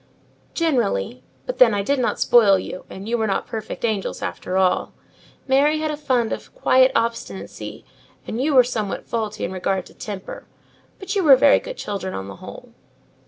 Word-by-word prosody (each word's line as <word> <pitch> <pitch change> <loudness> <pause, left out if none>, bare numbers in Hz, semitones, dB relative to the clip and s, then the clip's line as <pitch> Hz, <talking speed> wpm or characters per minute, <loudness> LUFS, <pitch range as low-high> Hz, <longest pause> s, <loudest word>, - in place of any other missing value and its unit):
"Generally: 215 - 0 0.2
but - - -5
then, 230 -4 +6
I 200 - 0
did 280 +6 0
not 245 - 0
spoil 215 -5 +5
you; 185 - -7
and 195 +2 -9
you 235 +1 0
were 220 - +1
not 195 - -1
perfect 220 +1 -5
angels 215 -4 -2
after 185 - -3
all: 185 -1 +1 0.5
Mary 285 +3 +3
had 310 0 -1
a - - -2
fund 255 -6 0
of - - -8
quiet 260 - +4
obstinacy, 230 0 -3 0.4
and 230 - -3
you 290 +1 +1
were 255 - +8
somewhat 220 -5 -3
faulty 215 -2 -3
in 170 - -5
regard 190 0 -2
to - - -16
temper; 200 -3 -8 0.5
but 395 +2 -5
you 390 - +2
were 285 -4 +8
very 280 +2 +5
good - - -8
children 195 -2 -4
on 95 0 -5
the 100 - -9
whole." - - -11
230 Hz, 185 wpm, -22 LUFS, 195-270 Hz, 0.5 s, were